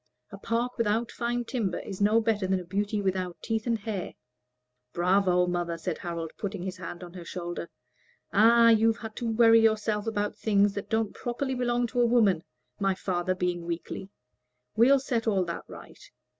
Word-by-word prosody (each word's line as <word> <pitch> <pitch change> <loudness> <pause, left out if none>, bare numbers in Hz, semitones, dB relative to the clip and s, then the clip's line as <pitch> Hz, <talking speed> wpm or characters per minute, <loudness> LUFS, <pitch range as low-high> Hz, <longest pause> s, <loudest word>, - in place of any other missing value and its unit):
A - - -8
park 235 +2 -2
without 230 +1 +1
fine 240 0 -2
timber 220 -8 -2
is 195 -1 -7
no 210 +3 +4
better 215 -4 0
than 190 0 +1
a - - -7
beauty 205 +3 -2
without 185 -2 -1
teeth 225 0 -2
and 230 -1 +2
hair." 205 -3 -5 0.8
"Bravo, 180 0 +3
mother!" 175 -1 -2
said 165 0 -4
Harold, 170 -2 -4
putting 200 -3 -4
his 185 -1 -5
hand 175 0 -7
on 175 -1 -10
her 180 -2 -8
shoulder. 175 -1 -6 0.6
"Ah, 230 +3 +6
you've 225 0 +4
had 220 -2 -8
to 240 - -3
worry 225 0 +6
yourself 215 -1 +1
about 205 -2 -2
things 205 -2 +3
that 200 - -6
don't 220 -2 0
properly 260 +2 -3
belong 245 -1 0
to 245 +1 0
a 240 - +4
woman 210 -8 +3 0.4
my 195 -1 +1
father 185 -1 -1
being 180 -1 -2
weakly. 175 +3 -5 0.7
We'll 255 +5 +6
set 245 -4 -2
all 195 -4 +2
that 170 - -5
right. - - -12
205 Hz, 180 wpm, -28 LUFS, 180-230 Hz, 0.8 s, Ah